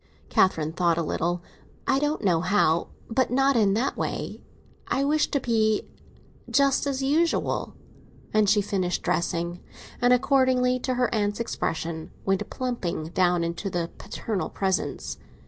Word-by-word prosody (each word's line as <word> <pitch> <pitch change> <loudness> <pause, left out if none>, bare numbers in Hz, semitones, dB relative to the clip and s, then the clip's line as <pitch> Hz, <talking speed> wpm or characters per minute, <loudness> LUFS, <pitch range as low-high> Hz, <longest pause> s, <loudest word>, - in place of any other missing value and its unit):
Catherine 160 -4 +2
thought 170 -2 +2
a 170 - +1
little. 170 +3 -1 0.4
"I 270 - +2
don't 295 -3 -1
know 175 -5 +3
how; 180 -3 +2 0.2
but 255 +2 +1
not 270 +2 +3
in 205 -4 +3
that 250 +5 0
way. - - -4 0.5
I 270 - +1
wish 300 +2 +2
to 280 - +1
be 220 -4 +1 0.7
just 280 0 +3
as 270 -1 -1
usual." 320 +5 +1 0.6
And 215 -2 +4
she 210 0 +4
finished 185 -3 -1
dressing, 170 0 -1 0.4
and, 245 0 +4
according 255 -1 +3
to 255 0 -1
her 245 -1 +1
aunt's 205 -1 0
expression, 165 -7 -3 0.2
went 195 +1 0
plumping 190 -11 -3
down 175 -1 +2
into 170 +4 -3
the 175 -2 -2
paternal 210 -5 -3
presence. 190 -1 -2
210 Hz, 145 wpm, -26 LUFS, 175-255 Hz, 0.7 s, And